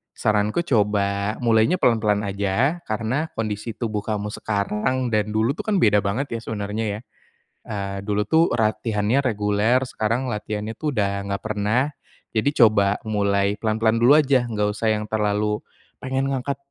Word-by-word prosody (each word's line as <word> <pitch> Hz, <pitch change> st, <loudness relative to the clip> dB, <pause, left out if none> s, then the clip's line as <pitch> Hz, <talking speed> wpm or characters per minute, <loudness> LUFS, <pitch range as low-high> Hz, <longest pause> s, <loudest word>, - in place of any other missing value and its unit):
saranku 105 Hz, +8 st, +1 dB
coba 105 Hz, -5 st, +1 dB
mulainya 115 Hz, +7 st, +4 dB
pelan-pelan 110 Hz, -, +2 dB
aja. 100 Hz, -, 0 dB
Karena 115 Hz, +8 st, -1 dB
kondisi 110 Hz, 0 st, -3 dB
tubuh 110 Hz, -2 st, -2 dB
kamu 105 Hz, 0 st, -3 dB
sekarang 110 Hz, +5 st, -1 dB
dan 105 Hz, 0 st, 0 dB
dulu 110 Hz, +4 st, +2 dB
tuh 150 Hz, -, -6 dB
kan 215 Hz, -, +2 dB
beda 105 Hz, -, +4 dB
banget 105 Hz, +8 st, -2 dB
ya, 115 Hz, -, -2 dB
sebenarnya. 105 Hz, 0 st, -4 dB, 0.6 s
Eee, 100 Hz, -2 st, -5 dB
dulu 105 Hz, +1 st, -1 dB
tuh 160 Hz, +9 st, +3 dB
latihannya 110 Hz, +1 st, +1 dB
reguler, 110 Hz, +1 st, +1 dB
sekarang 115 Hz, +1 st, -1 dB
latihannya 105 Hz, -1 st, -4 dB
tuh 150 Hz, +7 st, -3 dB
udah 100 Hz, -1 st, -1 dB
nggak 100 Hz, -1 st, -2 dB
pernah. 110 Hz, +7 st, 0 dB, 0.4 s
Jadi 110 Hz, +4 st, +2 dB
coba 105 Hz, -4 st, +4 dB
mulai 100 Hz, -2 st, +1 dB
pelan-pelan 110 Hz, +1 st, +1 dB
dulu 135 Hz, +5 st, +7 dB
aja, 135 Hz, -5 st, +2 dB
nggak 105 Hz, -2 st, 0 dB
usah 110 Hz, +1 st, -1 dB
yang 105 Hz, -, -4 dB
terlalu 105 Hz, 0 st, 0 dB, 0.4 s
pengen 130 Hz, +1 st, -1 dB
ngangkat 135 Hz, +1 st, -2 dB
110 Hz, 145 wpm, -23 LUFS, 105-120 Hz, 0.6 s, dulu